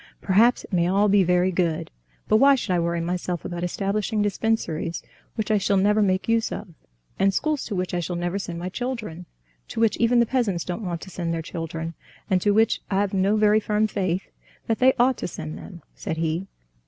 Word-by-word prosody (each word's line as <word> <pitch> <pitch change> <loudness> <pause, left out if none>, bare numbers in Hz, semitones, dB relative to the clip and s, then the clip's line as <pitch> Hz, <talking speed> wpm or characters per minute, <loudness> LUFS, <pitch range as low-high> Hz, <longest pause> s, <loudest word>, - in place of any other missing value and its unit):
"Perhaps 220 +6 +3
it - - -13
may 170 -1 +3
all 200 +3 +3
be 200 0 +5
very 180 +1 +2
good; 170 -2 -1 0.4
but 215 - +4
why 275 +4 +6
should 235 -6 -3
I 175 - +2
worry 170 0 -1
myself 175 0 -3
about 175 0 -4
establishing 205 +4 -1
dispensaries 205 -6 -1 0.3
which 220 0 -2
I 210 - +3
shall 200 0 +1
never 210 +3 +3
make 190 -2 +1
use 230 0 +1
of, 205 - -6 0.5
and 195 0 +4
schools 300 +7 -1
to 210 - -4
which 180 0 -2
I 175 - 0
shall 175 +1 -3
never 175 +3 -2
send 175 -3 -5
my 175 +2 -4
children, 215 -7 -5 0.4
to - - -6
which 225 -2 +3
even 235 +1 +3
the 235 - +5
peasants 220 -9 0
don't 180 +4 -4
want 170 -3 -3
to 190 - -10
send 170 -2 -3
their 165 - -3
children, 165 0 -5 0.4
and 185 -1 +3
to 205 - +2
which 220 +2 +3
I've 200 0 0
no 195 +2 +2
very 215 0 +4
firm 215 0 +1
faith 190 -3 -2 0.3
that 225 - -1
they 260 +1 +5
ought 250 +1 +3
to - - -3
send 155 -2 -6
them?" 175 -4 -11
said 160 - -5
he. 165 +3 -1
195 Hz, 215 wpm, -24 LUFS, 175-215 Hz, 0.5 s, why